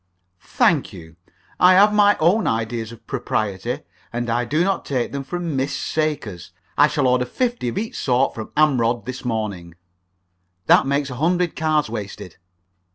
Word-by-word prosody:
"Thank -, -, +3 dB
you, 80 Hz, 0 st, -12 dB, 0.4 s
I 185 Hz, +1 st, +7 dB
have 205 Hz, +2 st, +6 dB
my 205 Hz, 0 st, +5 dB
own 185 Hz, +8 st, +3 dB
ideas 115 Hz, 0 st, -2 dB
of 115 Hz, -, -14 dB
propriety, 120 Hz, 0 st, -2 dB, 0.3 s
and 120 Hz, 0 st, -2 dB
I 120 Hz, +1 st, 0 dB
do 155 Hz, +7 st, +1 dB
not 195 Hz, +1 st, 0 dB
take 125 Hz, -4 st, -2 dB
them 140 Hz, 0 st, -4 dB
from 170 Hz, +2 st, -4 dB
Miss 135 Hz, +2 st, -1 dB
Sakers. 150 Hz, -, -3 dB, 0.2 s
I -, -, +6 dB
shall 145 Hz, -, 0 dB
order 125 Hz, 0 st, +3 dB
fifty 240 Hz, -, -2 dB
of 120 Hz, -, -3 dB
each 220 Hz, +2 st, -3 dB
sort 130 Hz, +1 st, +1 dB
from 110 Hz, -, -7 dB
Amrod's 120 Hz, -7 st, +2 dB
this 130 Hz, +1 st, -6 dB
morning." 105 Hz, -8 st, -4 dB, 0.9 s
"Then -, -, +7 dB
that -, -, -1 dB
makes 140 Hz, 0 st, 0 dB
a -, -, -6 dB
hundred 175 Hz, +3 st, +1 dB
cards 155 Hz, -1 st, +1 dB
wasted." 100 Hz, -5 st, -7 dB
130 Hz, 165 wpm, -21 LUFS, 115-155 Hz, 0.9 s, I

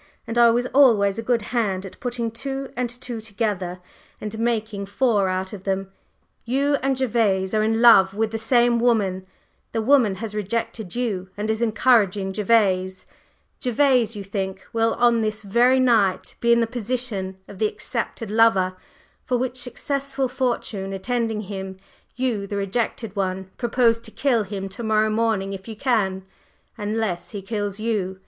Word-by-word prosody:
And 230 Hz, -, -5 dB
I 235 Hz, 0 st, +6 dB
was 240 Hz, +2 st, +2 dB
always 225 Hz, -7 st, +5 dB
a -, -, -1 dB
good 230 Hz, -1 st, 0 dB
hand 200 Hz, -5 st, 0 dB
at 190 Hz, -, -11 dB
putting 240 Hz, -2 st, -3 dB
two 270 Hz, +3 st, -5 dB
and 245 Hz, -1 st, -1 dB
two 240 Hz, -1 st, -6 dB
together 200 Hz, -4 st, -3 dB, 0.4 s
and 215 Hz, +1 st, -6 dB
making 220 Hz, -4 st, -1 dB
four 205 Hz, -2 st, +2 dB
out 185 Hz, +2 st, -2 dB
of 195 Hz, -2 st, -8 dB
them. 195 Hz, 0 st, -2 dB, 0.5 s
You 280 Hz, +4 st, +1 dB
and 270 Hz, 0 st, 0 dB
Gervase 215 Hz, -7 st, +1 dB
are 215 Hz, -, +2 dB
in 225 Hz, +2 st, +1 dB
love 195 Hz, -5 st, +7 dB
with 220 Hz, 0 st, 0 dB
the 225 Hz, -, -3 dB
same 240 Hz, 0 st, +3 dB
woman; 200 Hz, -6 st, +1 dB, 0.5 s
the 225 Hz, -, 0 dB
woman 245 Hz, -6 st, +4 dB
has 210 Hz, +2 st, -6 dB
rejected 210 Hz, -1 st, -3 dB
you 205 Hz, -7 st, -2 dB
and 215 Hz, +1 st, -1 dB
is 220 Hz, +1 st, -2 dB
encouraging 215 Hz, -4 st, +2 dB
Gervase; 190 Hz, -3 st, +1 dB, 0.6 s
Gervase, 250 Hz, -3 st, +2 dB
you 205 Hz, -, -5 dB
think, 190 Hz, -1 st, -4 dB
will 225 Hz, 0 st, +2 dB
on 240 Hz, -1 st, +3 dB
this 215 Hz, 0 st, -2 dB
very 240 Hz, +6 st, +3 dB
night 220 Hz, -7 st, +2 dB
be 235 Hz, -, +2 dB
in 235 Hz, 0 st, +5 dB
the -, -, +3 dB
position 225 Hz, -5 st, -3 dB
of 195 Hz, -, -11 dB
the 215 Hz, -, +3 dB
accepted 215 Hz, 0 st, -4 dB
lover, 210 Hz, -5 st, +3 dB, 0.5 s
for 250 Hz, -, 0 dB
which 255 Hz, +1 st, -2 dB
successful 270 Hz, +2 st, -2 dB
fortune 235 Hz, -6 st, -2 dB
attending 225 Hz, +2 st, -1 dB
him, 190 Hz, -2 st, -6 dB, 0.4 s
you, 240 Hz, -6 st, -1 dB
the 200 Hz, -, -4 dB
rejected 210 Hz, +1 st, -2 dB
one, 190 Hz, -1 st, -2 dB
propose 235 Hz, -1 st, +2 dB
to 230 Hz, -, -9 dB
kill 245 Hz, 0 st, +1 dB
him 195 Hz, -1 st, -5 dB
to 195 Hz, +5 st, -8 dB
morrow 215 Hz, -1 st, +2 dB
morning 215 Hz, -3 st, 0 dB
if 190 Hz, +1 st, -8 dB
you 225 Hz, -, -6 dB
can, 200 Hz, -6 st, 0 dB, 0.5 s
unless 210 Hz, -4 st, -2 dB
he 205 Hz, -3 st, -6 dB
kills 205 Hz, -1 st, -3 dB
you. 200 Hz, -4 st, -2 dB
220 Hz, 165 wpm, -23 LUFS, 195-240 Hz, 0.6 s, love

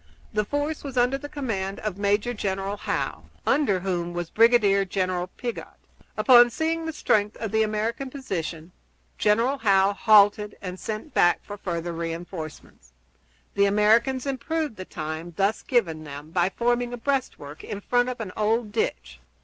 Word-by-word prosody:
The 210 Hz, -, +1 dB
force 290 Hz, +5 st, -2 dB
was 275 Hz, -3 st, -6 dB
under 250 Hz, +3 st, +2 dB
the 290 Hz, +1 st, -8 dB
command 200 Hz, -10 st, -3 dB
of 205 Hz, -3 st, -4 dB
Major 205 Hz, +4 st, +1 dB
General 195 Hz, -2 st, -2 dB
Howe, -, -, -3 dB, 0.2 s
under 205 Hz, -11 st, +2 dB
whom 175 Hz, -2 st, -2 dB
was 175 Hz, -1 st, -4 dB
Brigadier 215 Hz, -4 st, +4 dB
General 185 Hz, -1 st, -1 dB
Piggott. 240 Hz, +5 st, -7 dB, 0.4 s
Upon 240 Hz, -2 st, +7 dB
seeing 325 Hz, +5 st, -2 dB
the -, -, -1 dB
strength 210 Hz, -8 st, +1 dB
of 220 Hz, -2 st, -4 dB
the 220 Hz, 0 st, +2 dB
American 220 Hz, +5 st, -1 dB
position, 175 Hz, -, -5 dB, 0.5 s
General 230 Hz, +6 st, +2 dB
Howe 195 Hz, -3 st, +4 dB
halted, 210 Hz, -1 st, +4 dB
and 185 Hz, -1 st, -7 dB
sent 220 Hz, +7 st, -5 dB
back 175 Hz, -, +3 dB
for 205 Hz, -, -7 dB
further 175 Hz, -3 st, -4 dB
re 165 Hz, 0 st, -3 dB
enforcements. 160 Hz, -, -9 dB, 0.6 s
The 200 Hz, -, +3 dB
Americans 225 Hz, +6 st, +3 dB
improved 285 Hz, 0 st, -2 dB
the 185 Hz, -, -6 dB
time 160 Hz, +1 st, -6 dB
thus 200 Hz, +3 st, +1 dB
given 170 Hz, -, 0 dB
them 145 Hz, +1 st, -9 dB
by 175 Hz, +1 st, +2 dB
forming 240 Hz, +3 st, 0 dB
a -, -, -4 dB
breastwork 230 Hz, -, -3 dB
in 200 Hz, -, -5 dB
front 245 Hz, +4 st, +1 dB
of 250 Hz, -, -5 dB
an 210 Hz, -5 st, -5 dB
old 215 Hz, +1 st, 0 dB
ditch. 65 Hz, -, -3 dB
210 Hz, 160 wpm, -25 LUFS, 185-245 Hz, 0.6 s, Upon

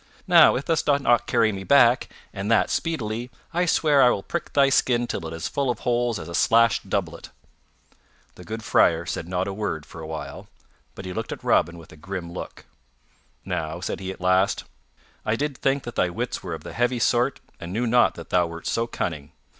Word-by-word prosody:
Now -, -, +7 dB
if 135 Hz, -, -3 dB
thou 165 Hz, -, +2 dB
dost 145 Hz, -3 st, +1 dB
not 120 Hz, -2 st, +3 dB
carry 110 Hz, -1 st, +3 dB
me 95 Hz, -1 st, -6 dB
back, 125 Hz, +1 st, +4 dB, 0.2 s
and 100 Hz, +1 st, -4 dB
that 115 Hz, -, +3 dB
speedily, 120 Hz, -7 st, -2 dB, 0.2 s
I 175 Hz, +1 st, +1 dB
swear 150 Hz, -4 st, +3 dB
I 125 Hz, -, +7 dB
will 100 Hz, -5 st, -1 dB
prick 170 Hz, -, -5 dB
thy 140 Hz, -1 st, +4 dB
skin 120 Hz, -2 st, +2 dB
till 90 Hz, -8 st, -4 dB
it -, -, -7 dB
is 80 Hz, 0 st, -7 dB
as -, -, 0 dB
full 140 Hz, -2 st, -1 dB
of 120 Hz, -, -2 dB
holes 120 Hz, -2 st, 0 dB
as 80 Hz, -, -8 dB
a 85 Hz, -, -7 dB
slashed 115 Hz, 0 st, +3 dB
doublet." 85 Hz, -4 st, -3 dB, 1.0 s
The 90 Hz, -, -13 dB
good 110 Hz, +3 st, -6 dB
Friar 85 Hz, -4 st, +3 dB
said 85 Hz, -1 st, -4 dB
not 90 Hz, +1 st, -1 dB
a 100 Hz, -, -3 dB
word 95 Hz, -7 st, -3 dB
for 80 Hz, -, -11 dB
a 80 Hz, -, -7 dB
while, 80 Hz, -1 st, -7 dB, 0.5 s
but 95 Hz, -, -8 dB
he 90 Hz, -, -5 dB
looked -, -, -4 dB
at -, -, -7 dB
Robin 85 Hz, +2 st, +2 dB
with 80 Hz, -1 st, -14 dB
a -, -, -14 dB
grim 90 Hz, 0 st, -6 dB
look. -, -, -8 dB, 0.8 s
"Now," 80 Hz, +2 st, -3 dB
said 90 Hz, -, -4 dB
he 95 Hz, -1 st, -5 dB
at 95 Hz, -, -7 dB
last, 95 Hz, +2 st, +2 dB, 0.6 s
"I 110 Hz, -, 0 dB
did 145 Hz, +3 st, -2 dB
think 135 Hz, 0 st, +1 dB
that 120 Hz, -, -7 dB
thy 90 Hz, -, +1 dB
wits 85 Hz, -, -4 dB
were -, -, -5 dB
of -, -, -11 dB
the -, -, -8 dB
heavy 120 Hz, +1 st, +1 dB
sort 120 Hz, +2 st, +1 dB, 0.2 s
and 85 Hz, -, -7 dB
knew 115 Hz, +6 st, -1 dB
not 120 Hz, +1 st, +3 dB
that 85 Hz, -, -10 dB
thou 90 Hz, -1 st, +3 dB
wert 85 Hz, 0 st, -9 dB
so 115 Hz, 0 st, 0 dB
cunning. 75 Hz, -10 st, -4 dB
110 Hz, 220 wpm, -24 LUFS, 85-125 Hz, 1.0 s, Now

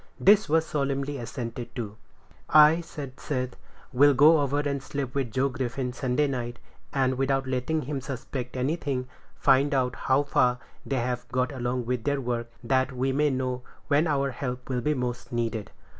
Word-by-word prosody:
This 205 Hz, -1 st, +5 dB
was 160 Hz, +1 st, +3 dB
solemnly 140 Hz, -1 st, -2 dB
assented 120 Hz, 0 st, -6 dB
to. 110 Hz, -5 st, -4 dB, 0.5 s
"I," 155 Hz, +2 st, +7 dB
said 140 Hz, -5 st, -8 dB
Seth, 130 Hz, -3 st, -3 dB, 0.4 s
"will 140 Hz, +2 st, +6 dB
go 155 Hz, +4 st, +7 dB
over 140 Hz, +1 st, 0 dB
and 140 Hz, -2 st, -2 dB
sleep 135 Hz, -2 st, -4 dB
with 135 Hz, -3 st, -1 dB
Joe 130 Hz, +4 st, +1 dB
Griffin 130 Hz, -1 st, -3 dB
Sunday 130 Hz, +3 st, +1 dB
night, 125 Hz, -3 st, -3 dB, 0.3 s
and, 130 Hz, -2 st, +1 dB
without 135 Hz, 0 st, +1 dB
letting 130 Hz, +5 st, -1 dB
him 140 Hz, +1 st, -3 dB
suspect 130 Hz, -1 st, -5 dB
anything, 135 Hz, -1 st, -1 dB, 0.3 s
find 140 Hz, +1 st, +3 dB
out 125 Hz, -1 st, +1 dB
how 135 Hz, +2 st, +2 dB
far 125 Hz, -3 st, +2 dB, 0.3 s
they've 125 Hz, -2 st, -1 dB
got 125 Hz, +2 st, 0 dB
along 125 Hz, -2 st, -2 dB
with 125 Hz, -1 st, -1 dB
their 145 Hz, -1 st, 0 dB
work, 120 Hz, -2 st, -2 dB
that 130 Hz, +2 st, +2 dB
we 130 Hz, +1 st, 0 dB
may 150 Hz, +2 st, +2 dB
know 130 Hz, -1 st, -2 dB, 0.3 s
when 150 Hz, +3 st, +3 dB
our 140 Hz, -2 st, +1 dB
help 125 Hz, 0 st, -5 dB
will 125 Hz, -2 st, 0 dB
be 150 Hz, +4 st, +1 dB
most 125 Hz, -2 st, -4 dB
needed." 115 Hz, -3 st, -2 dB
130 Hz, 170 wpm, -27 LUFS, 125-140 Hz, 0.5 s, I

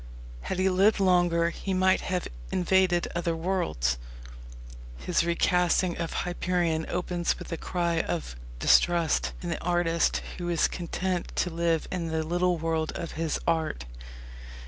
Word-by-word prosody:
Had 185 Hz, -, -3 dB
he 185 Hz, +1 st, +2 dB
lived 195 Hz, +3 st, +3 dB
longer 175 Hz, -3 st, +3 dB
he 190 Hz, +2 st, -3 dB
might 185 Hz, 0 st, +3 dB
have 180 Hz, -1 st, -2 dB, 0.2 s
invaded 180 Hz, -1 st, +2 dB
other 170 Hz, -1 st, -1 dB
worlds. 75 Hz, -, -1 dB, 1.0 s
His -, -, 0 dB
recasting 175 Hz, +1 st, +2 dB
of 170 Hz, -1 st, -2 dB
Hyperion 175 Hz, -2 st, 0 dB
opens 175 Hz, -1 st, -1 dB
with -, -, -9 dB
a -, -, -1 dB
cry 170 Hz, -1 st, -1 dB
of 160 Hz, -, -3 dB, 0.2 s
distrust 170 Hz, -, +3 dB
in 175 Hz, -, -3 dB
the 170 Hz, -, -3 dB
artist 175 Hz, -1 st, +1 dB, 0.2 s
who 175 Hz, 0 st, -3 dB
is 170 Hz, -2 st, +3 dB
content 180 Hz, +1 st, -3 dB
to 180 Hz, -, 0 dB
live 165 Hz, -1 st, 0 dB
in 175 Hz, -3 st, -2 dB
the 160 Hz, 0 st, -1 dB
little 175 Hz, +2 st, +1 dB
world 160 Hz, -1 st, -1 dB
of 170 Hz, -2 st, -5 dB
his 160 Hz, -1 st, -2 dB
art. 160 Hz, -, 0 dB
170 Hz, 145 wpm, -27 LUFS, 165-180 Hz, 1.0 s, lived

